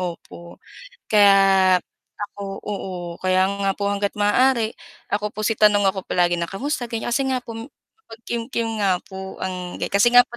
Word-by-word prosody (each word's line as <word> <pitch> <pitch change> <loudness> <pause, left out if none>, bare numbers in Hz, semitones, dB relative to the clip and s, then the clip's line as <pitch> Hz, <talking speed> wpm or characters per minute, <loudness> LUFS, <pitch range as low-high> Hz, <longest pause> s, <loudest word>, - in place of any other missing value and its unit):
opo 170 -1 -7 0.5
kaya 195 -3 +5 0.4
ako 200 -1 -6
oo 180 -4 -5
kaya 185 0 +3
nga 195 - +2
po 200 0 -1
hangga't 200 0 -1
maaari 225 +2 +3 0.4
ako 210 +1 -1
po - - -5
si 225 - +1
tanong 205 -2 +5
ako 190 -1 -3
palagi 175 -1 +2
na 170 - -1
kamusta 260 +6 -3
ganyan, 230 0 -3
kasi 240 +3 +1
nga 255 - 0
po 230 -2 -8
mapagkimkim 235 - -6
nga 185 -2 +2
po 190 0 -8
ang 180 -1 -5
kasi 210 +4 +3
nga 245 - +11
po 240 - -10
200 Hz, 160 wpm, -22 LUFS, 190-225 Hz, 0.5 s, nga